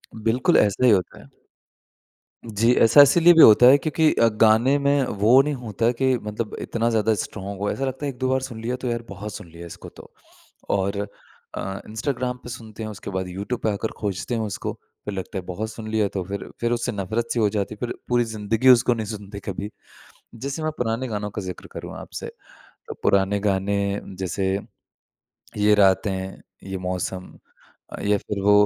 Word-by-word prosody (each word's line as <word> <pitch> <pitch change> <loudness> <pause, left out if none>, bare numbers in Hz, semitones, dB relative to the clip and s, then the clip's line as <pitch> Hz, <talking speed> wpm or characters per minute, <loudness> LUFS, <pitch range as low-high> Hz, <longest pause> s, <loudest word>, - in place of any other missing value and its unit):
बिल्कुल, 115 +3 +2
ऐसा 105 +4 +3
ही 120 - +7
होता 95 -3 0
है। - - -16 1.3
जी, 115 +4 +4
ऐसा 115 +6 +7
इसीलिए 170 +5 +6
भी 160 - +8
होता 110 +3 +8
है, 135 +3 +8
क्योंकि 155 +2 +2
अ, 115 - +4
गाने 115 +6 +5
में 140 -1 +2 0.2
वो 120 +6 +6
नहीं 150 0 -2
होता 115 -2 -1
कि 130 +1 +1
मतलब 105 +1 -5
इतना 115 0 -1
ज़्यादा 110 0 +2
स्ट्रॉन्ग 100 -1 -5
हो। 105 - 0
ऐसा 135 - -2
लगता 135 +2 -4
है, - - 0
1-2 130 +1 -2
बार 130 0 +2
सुन 120 -4 -7
लिया, 125 +2 -2
तो 130 0 -4
यार, 120 -1 -2
बहुत 100 +1 -7
सुन 85 - -9
लिया 85 +1 -10
इसको 85 - -10
तो। - - -14 0.6
और 100 0 0 0.5
अ, 95 0 -4
इंस्टाग्राम 125 +2 -2
पे - - -8
सुनते 115 -3 -8
हैं, 110 - -4
उसके 100 -1 -8
बाद 95 -1 -3
यूट्यूब 100 +7 -4
पे 110 - +1
आकर 105 +2 -3
खोजते 100 +2 -3
हैं 115 - -1
उसको। 105 -3 -4 0.3
फिर 105 - -4
लगता 95 +1 -5
है, 95 - -4
बहुत 105 +5 -4
सुन 110 -1 -8
लिया, 110 -2 +2
तो 95 -1 -4
फिर 100 +2 -6
फिर 120 0 0
उससे 120 +1 -1
नफ़रत-सी 110 +4 -2
हो 105 - +4
जाती 100 +1 -2
है। - - -19
फिर - - -5
पूरी 120 -1 +3
ज़िंदगी 110 +3 0
उसको 120 -1 +6
नहीं 110 -2 -4
सुनते 100 -1 -7
कभी। 100 +2 -5 0.6
जैसे 140 +6 -5
मैं 155 - 0
पुराने 120 +2 -1
गानों 105 -2 -3
का 100 - -5
ज़िक्र 90 -1 -7
करूँ - - -7
आपसे, - - -7 0.6
तो - - -5
पुराने 100 +1 +3
गाने, 100 0 0 0.4
जैसे 95 +1 -1 1.1
ये 105 0 +4
रातें, 95 -1 +1 0.3
ये 95 - -3
मौसम 90 0 -4 0.6
अ, - - -7
या 105 0 +2
फिर 100 -1 -5
वो 105 +1 +5
110 Hz, 195 wpm, -23 LUFS, 100-120 Hz, 1.3 s, भी